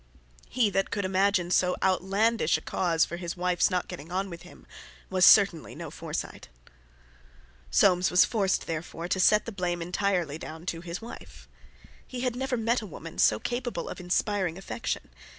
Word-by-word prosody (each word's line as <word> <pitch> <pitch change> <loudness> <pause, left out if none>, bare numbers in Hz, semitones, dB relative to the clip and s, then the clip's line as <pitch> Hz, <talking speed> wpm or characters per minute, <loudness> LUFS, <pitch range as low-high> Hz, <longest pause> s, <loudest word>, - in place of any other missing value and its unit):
He 230 -4 +2
that 195 0 0
could 200 -1 -2
imagine 185 -1 +1
so 180 0 +3
outlandish 190 +1 +2
a - - -10
cause 165 -3 +1
for 170 - -6
his 175 0 -5
wife's 180 -1 +2
not 180 -2 -1
getting 155 +5 -9
on 190 +1 -2
with 170 - -8
him 65 -3 -15 0.5
was - - +5
certainly - - +5
no - - -7
Forsyte. - - -6 1.2
Soames 180 - +4
was 180 - +5
forced, 200 -4 0
therefore, 165 +1 -5
to 190 - -1
set 210 +3 +4
the 230 - -5
blame 180 -3 -2
entirely 175 -3 -1
down 160 +1 -9
to 165 -2 -3
his 175 +3 -6
wife. 235 - -11 0.6
He 250 -1 -6
had 250 -2 -1
never 265 0 -2
met 230 +2 +1
a 215 - -7
woman 165 -1 -9
so 105 - +5
capable 245 - -3
of - - -7
inspiring 180 0 0
affection. 195 +4 -4
185 Hz, 170 wpm, -28 LUFS, 170-205 Hz, 1.2 s, was